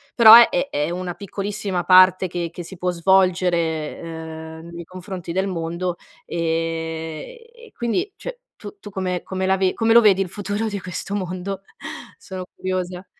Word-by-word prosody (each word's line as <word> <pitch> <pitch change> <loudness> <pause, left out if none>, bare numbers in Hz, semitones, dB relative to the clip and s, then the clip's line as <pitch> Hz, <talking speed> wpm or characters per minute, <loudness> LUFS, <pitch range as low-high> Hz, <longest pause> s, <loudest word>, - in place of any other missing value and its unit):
però 225 -2 +11
è 210 -6 +6
è 145 +2 -1
una 180 0 -4
piccolissima 200 -2 -3
parte 185 0 +6
che 175 -1 -3
che 175 - -7
si 190 +2 -10
può 180 +1 -1
svolgere, 175 -3 +1 0.6
uhm, 170 - -11
nei 170 0 -7
confronti 185 -2 -7
del 190 +1 0
mondo. 170 0 -3 0.3
E 165 - -3
e 470 -1 -16
quindi 360 - -2
cioè - - -7 0.2
tu 205 -1 -10
tu 205 - -10
come 185 -2 -2
come 190 0 -3
la 190 0 +3
ve 190 -1 +1
come 225 0 +2
lo 235 - +8
vedi 195 -3 +5
il 185 - -2
futuro 205 +3 -3
di 205 - -4
questo 185 +2 -5
mondo? 185 0 -4 0.6
Sono 185 -1 -7
curiosa. 185 0 -3
185 Hz, 165 wpm, -22 LUFS, 175-200 Hz, 0.6 s, però